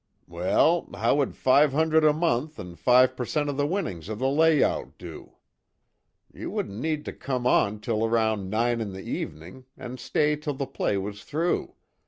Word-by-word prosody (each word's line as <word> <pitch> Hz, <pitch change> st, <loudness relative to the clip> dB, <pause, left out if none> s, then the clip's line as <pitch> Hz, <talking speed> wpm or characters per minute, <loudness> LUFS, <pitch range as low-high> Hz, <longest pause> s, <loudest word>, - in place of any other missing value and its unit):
"Well, 95 Hz, -, +1 dB
how -, -, +2 dB
would 140 Hz, -3 st, 0 dB
five 140 Hz, +2 st, +4 dB
hundred 160 Hz, +1 st, +3 dB
a 155 Hz, -, +6 dB
month, 150 Hz, -1 st, -1 dB
an' 90 Hz, -1 st, -8 dB
five 125 Hz, +4 st, +4 dB
percent 145 Hz, +4 st, -2 dB
of 140 Hz, -, -7 dB
the 145 Hz, 0 st, +1 dB
winnings 105 Hz, -, -3 dB
of 110 Hz, -, -4 dB
the 130 Hz, -, 0 dB
layout 155 Hz, +1 st, +2 dB
do? -, -, -10 dB, 1.0 s
You -, -, -6 dB
wouldn't 100 Hz, +2 st, -4 dB
need 155 Hz, 0 st, -2 dB
to -, -, -5 dB
come 130 Hz, -3 st, -4 dB
on 105 Hz, -4 st, +2 dB
till 110 Hz, 0 st, -1 dB
around 110 Hz, -4 st, 0 dB
nine 115 Hz, +2 st, 0 dB
in 100 Hz, -3 st, -4 dB
the 95 Hz, -, -8 dB
evening, 85 Hz, +12 st, -6 dB
and 125 Hz, +1 st, -8 dB
stay 150 Hz, +4 st, +1 dB
till 150 Hz, -1 st, -4 dB
the 140 Hz, 0 st, -3 dB
play 100 Hz, -, -1 dB
was 100 Hz, +1 st, -5 dB
through. 165 Hz, +4 st, -2 dB
130 Hz, 180 wpm, -26 LUFS, 105-150 Hz, 1.0 s, a